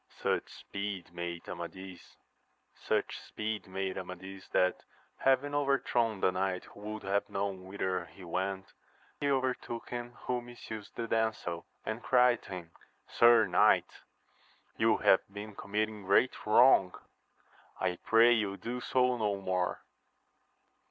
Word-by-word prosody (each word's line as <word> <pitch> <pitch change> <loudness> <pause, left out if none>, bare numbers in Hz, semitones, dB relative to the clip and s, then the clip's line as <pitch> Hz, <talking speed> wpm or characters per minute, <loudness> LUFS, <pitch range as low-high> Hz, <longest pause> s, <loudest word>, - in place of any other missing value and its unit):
UCH - - +1
speed 100 -4 -6
made 85 -1 -5
Amadis, 90 +1 -8 0.8
that, 95 -3 -2 0.4
having 135 +2 +2
over 140 -1 +3
thrown 115 -7 0
the 95 - +4
knight 95 0 -1
who - - -15
would 105 +1 -6
Jiave 100 +1 0
known 100 -1 -3
whither 95 -2 -2
he 95 - -14
went, 95 +2 -3 0.5
he 145 - 0
overtook 130 -3 -1
him 120 0 -5
who 125 -1 -1
misused 115 -3 -9
the 115 - -3
damsel, 110 -7 -1 0.2
and 110 +2 -3
cried 125 -2 +4
to - - -13
him. 90 -3 -7 0.4
Sir 120 -2 +6
knight, - - +3 0.7
you - - +3
have - - +5
been 105 +1 -8
committing 105 +1 -2
great 105 +4 +2
wrong: 105 -4 +6 0.8
I 90 -1 0
pray 115 +1 +5
you 105 -4 +1
do 125 +4 -5
so 125 0 +2
no 105 -3 0
more. 90 -2 -1
105 Hz, 125 wpm, -31 LUFS, 95-120 Hz, 0.8 s, Sir